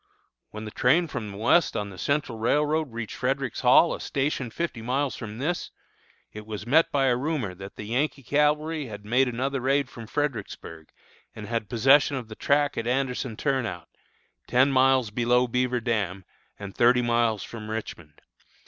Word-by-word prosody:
"When 110 Hz, 0 st, -8 dB
the 105 Hz, -, -7 dB
train 160 Hz, +12 st, +3 dB
from 110 Hz, -8 st, -5 dB
the 100 Hz, -, -9 dB
west 120 Hz, +11 st, +3 dB
on 105 Hz, -1 st, -3 dB
the 90 Hz, -, -11 dB
Central 140 Hz, -2 st, -1 dB
Railroad 150 Hz, +4 st, +1 dB
reached 115 Hz, -2 st, -6 dB
Frederick's 135 Hz, -1 st, -2 dB
Hall, 130 Hz, +7 st, +5 dB
a -, -, -5 dB
station 135 Hz, -3 st, -2 dB
fifty 165 Hz, -3 st, -4 dB
miles 130 Hz, +4 st, -1 dB
from 110 Hz, -2 st, -7 dB
this, 160 Hz, +8 st, -2 dB, 0.6 s
it 105 Hz, 0 st, -9 dB
was 105 Hz, -1 st, -6 dB
met 155 Hz, +7 st, +4 dB
by 140 Hz, -2 st, +2 dB
a 125 Hz, -2 st, +3 dB
rumor 130 Hz, -, -2 dB
that 95 Hz, +2 st, -10 dB
the -, -, -7 dB
Yankee 135 Hz, +6 st, -1 dB
cavalry 150 Hz, +2 st, +1 dB
had 105 Hz, -2 st, -9 dB
made 125 Hz, +5 st, +3 dB
another 130 Hz, +2 st, -2 dB
raid 135 Hz, +1 st, +1 dB
from 115 Hz, -2 st, -10 dB
Fredericksburg, 110 Hz, -, -4 dB, 0.5 s
and 110 Hz, -, -7 dB
had 115 Hz, -2 st, -3 dB
possession 135 Hz, +4 st, +4 dB
of 120 Hz, -4 st, -7 dB
the 110 Hz, -, -8 dB
track 145 Hz, +3 st, +1 dB
at 115 Hz, -, -4 dB
Anderson 125 Hz, -2 st, -1 dB
Turnout, 135 Hz, -5 st, -2 dB, 0.6 s
ten 130 Hz, +3 st, +3 dB
miles 130 Hz, -3 st, +3 dB
below 125 Hz, +2 st, +2 dB
Beaver 125 Hz, +1 st, 0 dB
Dam, 100 Hz, -5 st, -2 dB, 0.3 s
and 100 Hz, -1 st, -8 dB
thirty 125 Hz, +1 st, +4 dB
miles 115 Hz, -3 st, +1 dB
from 110 Hz, -2 st, -8 dB
Richmond. 85 Hz, -8 st, -7 dB
125 Hz, 175 wpm, -26 LUFS, 110-140 Hz, 0.6 s, Hall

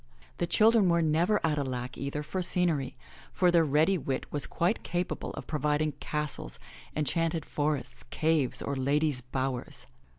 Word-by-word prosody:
The 175 Hz, -, +1 dB
children 215 Hz, +1 st, +5 dB
were 170 Hz, -1 st, +3 dB
never 170 Hz, +7 st, +3 dB
at 150 Hz, -2 st, +1 dB
a -, -, +1 dB
lack, 125 Hz, 0 st, -4 dB
either, 140 Hz, +2 st, -3 dB
for 185 Hz, +5 st, -3 dB
scenery, 170 Hz, -8 st, +1 dB, 0.3 s
for 180 Hz, -1 st, +3 dB
their 170 Hz, -1 st, +5 dB
ready 155 Hz, +5 st, +3 dB
wit 135 Hz, -2 st, -2 dB
was 145 Hz, -, -1 dB
quite 175 Hz, +6 st, 0 dB
capable 175 Hz, 0 st, -3 dB
of -, -, -7 dB
providing 150 Hz, 0 st, 0 dB
castles, 150 Hz, -, -3 dB, 0.4 s
enchanted 160 Hz, +2 st, 0 dB
forests, 145 Hz, -4 st, -2 dB
caves 155 Hz, -5 st, +1 dB
or 140 Hz, -, -2 dB
ladies* 140 Hz, +1 st, +1 dB
bowers. 130 Hz, 0 st, -3 dB
150 Hz, 155 wpm, -29 LUFS, 140-170 Hz, 0.4 s, children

